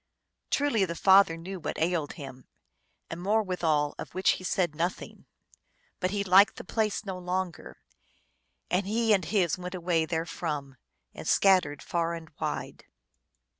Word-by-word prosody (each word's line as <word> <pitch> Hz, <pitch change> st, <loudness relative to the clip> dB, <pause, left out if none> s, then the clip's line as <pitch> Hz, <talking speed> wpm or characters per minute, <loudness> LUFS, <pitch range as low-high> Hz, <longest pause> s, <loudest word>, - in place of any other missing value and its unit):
Truly 280 Hz, -8 st, +2 dB
the 170 Hz, -3 st, -2 dB
father 190 Hz, -2 st, +5 dB
knew 185 Hz, +3 st, -7 dB
what 150 Hz, -, -4 dB
ailed 165 Hz, -2 st, 0 dB
him, 135 Hz, -4 st, -10 dB, 0.6 s
and 165 Hz, +1 st, -6 dB
more 215 Hz, +4 st, +2 dB
withal, 160 Hz, -6 st, 0 dB
of -, -, -8 dB
which 185 Hz, +1 st, +3 dB
he -, -, -4 dB
said 180 Hz, -3 st, 0 dB
nothing. 170 Hz, +4 st, -4 dB, 0.7 s
But 185 Hz, -, 0 dB
he 200 Hz, +1 st, -1 dB
liked 195 Hz, +2 st, +6 dB
the -, -, -8 dB
place 215 Hz, +1 st, -1 dB
no 190 Hz, -2 st, -5 dB
longer, 180 Hz, -1 st, -4 dB, 0.9 s
and 185 Hz, +2 st, +1 dB
he 225 Hz, +1 st, +2 dB
and 190 Hz, -3 st, +2 dB
his 185 Hz, -1 st, 0 dB
went 180 Hz, +1 st, -6 dB
away 170 Hz, -2 st, 0 dB
therefrom, 155 Hz, -4 st, -3 dB, 0.4 s
and -, -, -8 dB
scattered 180 Hz, -7 st, +3 dB
far 170 Hz, 0 st, -1 dB
and 165 Hz, 0 st, -10 dB
wide. -, -, -4 dB
180 Hz, 150 wpm, -28 LUFS, 165-195 Hz, 0.9 s, liked